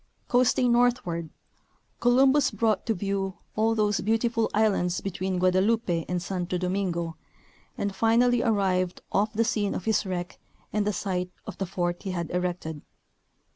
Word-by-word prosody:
Coasting 250 0 +3
northward, 235 -10 +1 0.7
Columbus 265 +3 +4
brought 225 -2 0
to 225 - +1
view 195 0 -2 0.2
all 225 +1 +2
those 210 -2 +1
beautiful 225 +1 +1
islands 200 -5 +1
between 190 -1 -3
Guadeloupe 190 +6 +2 0.2
and 180 0 0
Santo 180 0 -3
Domingo 180 -3 -2 0.6
and 200 -1 -2
finally 235 +3 +3
arrived 190 -5 +1
off 210 +2 +1
the 230 +1 +1
scene 210 -3 0
of - - -5
his 220 -1 +2
wreck 180 -2 -5 0.3
and 210 -1 +1
the - - +2
site 180 -2 -2 0.2
of - - -8
the 195 - -2
fort 175 -1 -2
he 195 - -5
had 170 -3 -3
erected. 175 -4 -3
195 Hz, 145 wpm, -27 LUFS, 180-225 Hz, 0.7 s, Columbus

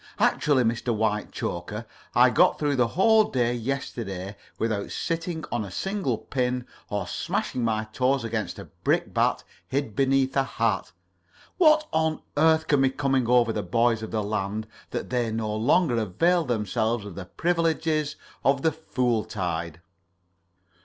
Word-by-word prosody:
Actually, 140 -4 +3
Mr. 120 +1 0
Whitechoker, 105 -1 -2 0.3
I - - +6
got - - +4
through 145 -2 0
the 125 -2 +3
whole 215 - +4
day 120 -6 0
yesterday 115 -6 -4 0.2
without 110 -3 -1
sitting 165 -1 -3
on 120 -3 -1
a 100 - -7
single 190 - -2
pin 125 0 -2 0.2
or 105 -1 -2
smashing 125 - -2
my 110 -1 +1
toes 130 +1 +1
against 115 -1 -3
a - - -8 0.2
brickbat - - +1 0.2
hid 135 -6 -2
beneath 135 0 +2
a 135 - +4
hat. 115 -6 -1 0.7
What 310 -3 +5
on 160 0 0
earth 160 +1 +4
can 145 -2 +3
be 135 - +4
coming 135 -2 0
over 120 -2 +4
the 105 - -1
boys 115 0 +1
of 110 - -5
the 110 -1 -1
land 105 +1 -2 0.2
that - - -5
they 120 -3 0
no 110 -1 -2
longer 125 +4 +3
avail 165 - +2
themselves 110 -1 -1
of 100 - -7
the 95 +1 -7
privileges 160 - 0 0.3
of 135 0 +2
the 160 - +4
fool 125 -7 -1
tide?" 85 -4 -4
125 Hz, 150 wpm, -26 LUFS, 110-145 Hz, 0.7 s, I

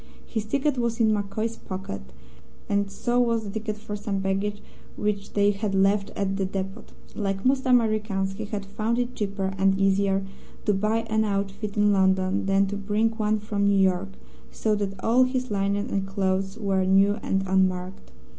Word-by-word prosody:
His 220 -2 -3
ticket 275 +3 0
was 235 -1 -1
in 220 -2 +4
MacCoy's 215 +2 -2
pocket, 185 - -6 0.7
and 200 -1 +1
so 240 +5 0
was 230 -2 +2
the 200 - -6
ticket 215 0 -4
for 210 -1 -6
some 205 -1 -3
baggage 195 +2 -1 0.4
which 205 -1 -2
they 205 0 +4
had 200 0 -2
left 195 +1 +3
at 195 -1 -1
the 195 - 0
depot. 195 +3 -4 0.3
Like 195 -1 -2
most 260 0 +2
Americans, 215 -5 +2
he 215 +2 -5
had 205 -1 -4
found 215 +4 -1
it 245 0 -1
cheaper 195 -3 -2
and 195 0 +3
easier 195 0 +2 0.4
to 210 - +3
buy 215 +3 +1
an 220 -1 0
outfit 200 0 -2
in 205 0 +4
London 190 0 +2
than 195 0 +4
to 200 +1 -3
bring 210 +3 +1
one 215 -1 0
from 205 -1 0
New 200 0 +4
York, 190 0 +2 0.4
so 215 - 0
that 200 -2 -2
all 245 +3 +5
his 255 -2 -2
linen 200 +2 0
and 195 -1 -1
clothes 195 0 -1
were 195 -3 +1
new 195 +3 +4
and 195 0 0
unmarked. 185 - 0
200 Hz, 180 wpm, -25 LUFS, 195-215 Hz, 0.7 s, all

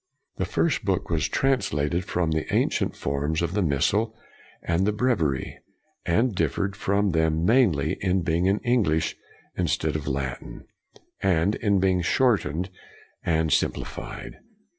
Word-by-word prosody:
The - - 0
first 165 -7 0
book 95 -3 -1
was 80 -2 +1
translated 90 - 0
from 85 -4 -1
the 80 0 -2
ancient - - +1
forms 70 +3 -1
of 85 +1 -1
the 105 - +1
missal 95 +9 +1 0.5
and 85 +2 +1
the - - +3
bre 125 +5 +2
viary, 75 - -1 0.5
and 115 +7 +2
differed 100 +1 -1
from 100 0 +1
them 80 0 +1
mainly 105 - +3
in 95 -1 +1
being 85 +2 +1
in 100 +2 +3
English 100 -11 +1 0.4
instead 80 -1 0
of 75 -2 -3
Latin, 65 -3 -4 0.6
and 95 +1 +2
in 100 -3 +1
being 95 -1 +2
shortened 90 - +1 0.5
and 80 -2 +1
simplified. - - -3
90 Hz, 140 wpm, -25 LUFS, 80-100 Hz, 0.6 s, the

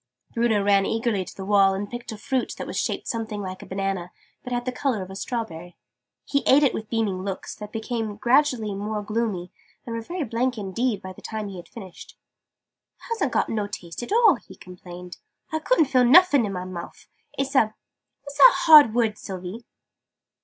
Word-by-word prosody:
Bruno 230 -3 +2
ran 200 -1 +3
eagerly 225 -4 0
to - - -12
the 190 - -7
wall, 195 -1 +4
and 200 +1 -3
picked 240 +2 -7
a 220 - -7
fruit 255 +4 -2
that - - -5
was - - -7
shaped - - -2
something 220 -2 -3
like 185 -1 -6
a - - -11
banana, 190 -2 -3 0.3
but 250 - -7
had 245 0 -2
the 255 - -1
colour 250 -6 -1
of 185 - -10
a - - -8
strawberry. 185 -7 -5 0.5
He 280 - 0
ate 285 +3 +6
it 275 - +3
with 215 -1 -5
beaming 215 -5 -1
looks, 195 0 -5
that 210 -1 -9
became 225 -2 -3
gradually 240 -2 +2
more 210 +1 -3
gloomy, 210 -5 -2 0.3
and 230 - -5
were 230 - -3
very 345 +8 -4
blank 245 +1 -1
indeed 210 +2 -2
by 185 0 -7
the - - -15
time 215 -2 -5
he 190 - -8
had 175 - -11
finished. 190 -6 -11 0.8
"It - - -24
hasn't 400 - 0
got - - +1
no 210 -2 -1
taste 175 -3 -7
at 240 - -7
all!" 455 +1 +5
he - - -15
complained. 180 0 -11 0.3
"I 315 - -1
couldn't 320 -1 +3
feel 255 -2 +3
nuffin 285 - +6
in 195 - -4
my 180 0 -4
mouf! 175 -2 -9 0.3
It's 275 0 -2
a 220 -5 +3 0.5
what's 285 0 -9
that 275 - +9
hard 300 -9 +8
word, 225 -3 +1
Sylvie?" 190 +4 -7
220 Hz, 205 wpm, -24 LUFS, 195-245 Hz, 0.8 s, that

